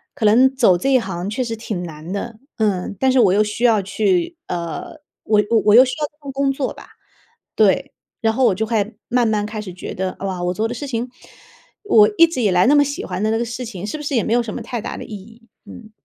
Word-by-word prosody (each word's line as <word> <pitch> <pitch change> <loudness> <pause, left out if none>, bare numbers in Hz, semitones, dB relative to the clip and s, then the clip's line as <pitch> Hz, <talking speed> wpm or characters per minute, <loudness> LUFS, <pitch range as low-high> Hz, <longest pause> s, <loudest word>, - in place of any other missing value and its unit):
可 220 - -2
能 255 +5 +5
走 220 -9 +4
这 270 - -1
一 - - +7
行 190 -2 -4
确 255 +4 -2
实 230 -1 -4
挺 210 -5 -5
难 160 +1 -8
的。 220 +2 -5 0.2
嗯， 200 -3 -1
但 265 -1 +3
是 260 - +3
我 200 -6 +5
又 210 +2 +4
需 210 +3 -2
要 220 -4 +4
去， 195 - 0
呃， 175 - -5 0.2
我 210 -1 +3 0.2
我 210 0 +6
又 250 - +9
需 255 - -3
要 300 - 0
这 - - -35
份 275 - -6
工 275 0 0
作 270 -1 -3
吧。 - - -14 0.7
对， - - +2 0.3
然 225 -1 +2
后 255 +3 +2
我 190 - +3
就 220 - -1
会 215 -1 -1
慢 245 -1 +2
慢 210 -1 0
开 215 0 -6
始 185 -4 -8
觉 180 - -7
得， 185 0 -3
哇， 190 -2 -3
我 180 +1 0
做 215 +4 -1
的 240 - -5
事 280 +4 -6
情， 240 -1 -3 0.7
我 225 - +5
一 335 - +8
直 320 -7 -3
以 205 - +2
来 180 0 +4
那 290 - +5
么 290 - +6
喜 285 +6 -4
欢 180 +1 -4
的 215 - +1
那 225 - +1
个 235 - 0
事 240 +2 -6
情， 205 -4 -7
是 305 - -4
不 300 - -8
是 285 -1 -2
也 230 - +2
没 - - -3
有 240 - +3
什 215 - -6
么 - - -5
太 240 -2 -5
大 230 - -5
的 - - -7
意 - - -15
义。 225 +4 -14 0.2
嗯。 220 -2 -12
220 Hz, 285 characters per minute, -20 LUFS, 195-250 Hz, 0.7 s, 又